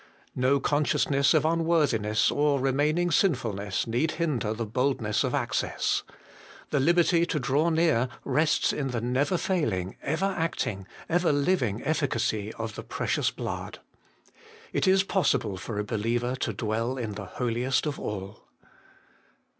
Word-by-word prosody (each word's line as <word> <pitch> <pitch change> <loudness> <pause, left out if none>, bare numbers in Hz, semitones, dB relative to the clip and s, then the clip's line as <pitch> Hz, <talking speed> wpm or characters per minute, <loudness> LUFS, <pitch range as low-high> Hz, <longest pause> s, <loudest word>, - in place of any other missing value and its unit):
No 130 +2 +2
consciousness 140 0 +2
of 155 -1 +3
unworthiness 155 -10 +2
or 145 -1 +2
remaining 150 +6 +1
sinfulness 110 - 0
need 120 +8 0
hinder 140 -10 -1
the 115 +1 -3
boldness 120 -1 0
of - - 0
access: - - 0 0.7
the 145 - +2
liberty 170 +3 +3
to 150 - -1
draw 140 +5 +1
near 160 -7 +2 0.2
rests 150 +4 +2
in 140 -2 -2
the 125 -3 -2
never 130 +9 0
failing, 110 - -1
ever 160 +6 -1
acting, 160 - -2 0.2
ever 175 0 +2
living 140 - +1
efficacy 115 -8 -1
of 110 -1 -5
the - - -6
Precious - - -1
Blood. - - -5 1.0
It - - +1
is 190 0 +5
possible 175 - +1
for 105 +3 -6
a 105 - 0
believer 115 +4 -1
to 130 - -2
dwell 115 +4 -2
in 115 -4 -3
the 100 0 -6
Holiest 125 +3 0
of 150 -2 -3
all. 100 0 -6
130 Hz, 140 wpm, -27 LUFS, 110-155 Hz, 1.0 s, is